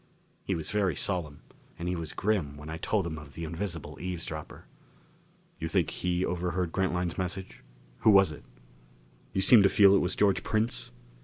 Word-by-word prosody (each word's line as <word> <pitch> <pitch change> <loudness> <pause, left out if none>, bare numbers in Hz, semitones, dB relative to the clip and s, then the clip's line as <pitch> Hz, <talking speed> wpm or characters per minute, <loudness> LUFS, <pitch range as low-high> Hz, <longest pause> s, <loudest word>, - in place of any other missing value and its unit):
He - - -1
was 80 -2 -4
very 100 -6 +1
solemn. 80 -6 -2 0.4
And 85 - -4
he 90 - 0
was 80 -3 -5
grim 95 -9 -1
when 75 +2 -8
I 80 - -4
told 95 +3 0
him 80 -2 -4
of 70 -2 -13
the 85 - -5
invisible 80 -3 -5
eavesdropper. 90 -2 -5 0.9
"You - - -2
think - - +1
he 90 0 -1
overheard 90 -1 -1
Grantline's 90 -2 -1
message? 95 +1 -4 0.4
Who - - +4
was 95 -5 +6
it? 75 - -10 0.9
You 95 - 0
seem 110 +3 +7
to 100 - +5
feel 100 -1 +6
it 100 - +5
was 90 - 0
George 100 -2 +3
Prince?" 110 +2 -1
90 Hz, 175 wpm, -29 LUFS, 80-95 Hz, 0.9 s, seem